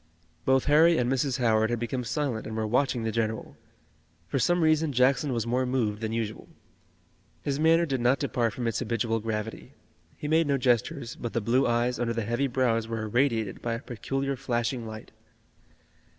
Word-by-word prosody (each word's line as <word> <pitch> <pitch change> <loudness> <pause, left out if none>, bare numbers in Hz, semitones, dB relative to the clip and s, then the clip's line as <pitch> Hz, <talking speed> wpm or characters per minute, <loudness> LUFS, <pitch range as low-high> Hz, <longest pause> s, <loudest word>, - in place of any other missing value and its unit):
Both 130 0 +3
Harry 160 +3 +5
and 125 +1 +1
Mrs. 135 -1 0
Howard 110 -3 +2
had 120 - 0
become 120 +2 -3
silent 120 -1 -2
and 110 0 -5
were 110 - 0
watching 125 +1 +1
the 110 - -1
general. 110 -1 -2 0.7
For 135 - -1
some 175 +6 +2
reason 155 -1 +3
Jackson 130 +2 +2
was 115 -3 -1
more 125 +2 +1
moved 115 -5 -1
than 110 -1 -2
usual. 110 -2 -4 1.0
His 140 0 -1
manner 165 +2 +4
did 135 -5 -2
not 125 +3 +3
depart 120 -3 -1
from 125 - -4
its 115 - 0
habitual 115 -1 -1
gravity. 110 0 -5 0.4
He 150 - -5
made 160 +1 +3
no 140 -1 +2
gestures, 120 -1 0
but 120 - -6
the - - +1
blue 120 +5 +2
eyes 120 +1 +1
under 120 -1 0
the 115 -1 -2
heavy 120 +5 0
brows 120 -3 +1
were 115 -1 -3
irradiated 115 -2 0
by 120 - -2
a - - -5
peculiar 135 +3 -3
flashing 120 -1 -2
light. 110 -1 -9
120 Hz, 185 wpm, -27 LUFS, 115-135 Hz, 1.0 s, Harry